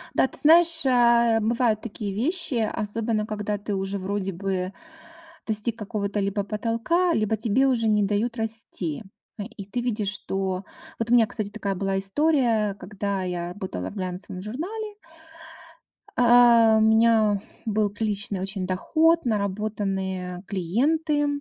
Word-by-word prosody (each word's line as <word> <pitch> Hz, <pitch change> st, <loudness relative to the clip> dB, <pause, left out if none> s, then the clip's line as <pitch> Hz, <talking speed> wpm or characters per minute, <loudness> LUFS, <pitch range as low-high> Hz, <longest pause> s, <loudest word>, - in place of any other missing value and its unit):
Да, -, -, +3 dB
ты -, -, -12 dB
знаешь, 325 Hz, 0 st, +6 dB
а, 235 Hz, -2 st, +4 dB
бывают 225 Hz, 0 st, 0 dB
такие 210 Hz, -3 st, -5 dB
вещи, 300 Hz, -, +2 dB, 0.2 s
особенно 215 Hz, +1 st, 0 dB
когда 210 Hz, -1 st, -3 dB
ты 205 Hz, 0 st, -5 dB
уже 195 Hz, +1 st, -3 dB
вроде 195 Hz, 0 st, -3 dB
бы 185 Hz, 0 st, -3 dB, 0.7 s
достиг 220 Hz, +1 st, 0 dB
какого-то 205 Hz, -1 st, -3 dB
либо 200 Hz, +1 st, -1 dB
потолка, 230 Hz, -, 0 dB
либо 220 Hz, -4 st, 0 dB
тебе 225 Hz, +5 st, +1 dB
уже 235 Hz, -4 st, +1 dB
не 210 Hz, -1 st, +2 dB
дают 210 Hz, +4 st, -1 dB
расти. 220 Hz, -7 st, -4 dB, 0.4 s
Э, -, -, -3 dB
и 210 Hz, -2 st, -10 dB
ты 200 Hz, +5 st, -4 dB
видишь, 220 Hz, -4 st, -1 dB
что 190 Hz, -2 st, -4 dB, 0.3 s
Вот 230 Hz, 0 st, -2 dB
у -, -, +5 dB
меня, 230 Hz, -2 st, +5 dB
кстати, 205 Hz, 0 st, -5 dB
такая 200 Hz, -2 st, -4 dB
была 195 Hz, +1 st, -2 dB
история, 225 Hz, -2 st, +1 dB
когда 200 Hz, 0 st, -4 dB
я 175 Hz, -1 st, -3 dB
работала 180 Hz, -, -6 dB
в -, -, -12 dB
глянцевом 185 Hz, -1 st, 0 dB
журнале. 390 Hz, -, -6 dB, 1.2 s
А, 235 Hz, -2 st, +6 dB
у -, -, +2 dB
меня 220 Hz, -2 st, +3 dB, 0.2 s
был 215 Hz, -1 st, 0 dB
приличный 205 Hz, -2 st, 0 dB
очень 190 Hz, -1 st, -3 dB
доход, 325 Hz, -, +2 dB
наработанные 195 Hz, -4 st, -3 dB
клиенты, 290 Hz, -, 0 dB
215 Hz, 140 wpm, -24 LUFS, 195-235 Hz, 1.2 s, знаешь